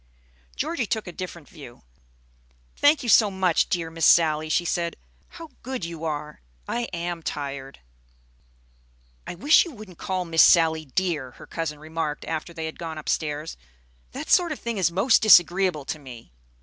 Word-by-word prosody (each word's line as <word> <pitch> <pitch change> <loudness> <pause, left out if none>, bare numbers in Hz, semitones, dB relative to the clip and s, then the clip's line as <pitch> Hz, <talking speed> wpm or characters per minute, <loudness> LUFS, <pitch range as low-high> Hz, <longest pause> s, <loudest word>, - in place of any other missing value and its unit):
Georgie 270 -10 -2
took 220 +1 -2
a 175 - -7
different 175 -4 -8
view. 130 -6 -13 0.9
"Thank 290 0 +3
you - - -5
so 215 -1 +6
much, 190 -3 +1
dear 170 -4 -2
Miss 165 -1 +2
Sally," 155 -2 +4
she 175 +2 +1
said. 170 0 -1 0.3
"How 330 -3 -12
good 255 -7 -5
you 165 -1 -8
are! 150 -1 -5 0.3
I 240 0 -2
am 175 -3 -5
tired." 140 - -6 1.5
"I - - -5
wish 285 - +5
you 350 - -8
wouldn't 210 - -13
call 185 -2 -2
Miss 165 -1 +3
Sally 160 -2 +5
'dear,'" 150 -3 -2
her - - -13
cousin 160 -2 -4
remarked 155 0 -4
after 160 +1 -4
they 165 -1 -6
had 160 - -7
gone 165 -2 -6
upstairs. 155 0 -3 0.5
"That - - -6
sort 350 -2 +4
of 300 - -3
thing 235 -3 -4
is 170 -3 +2
most 210 +7 +3
disagreeable 180 -6 +5
to 155 - -4
me. 120 - -12
170 Hz, 165 wpm, -24 LUFS, 155-190 Hz, 1.5 s, so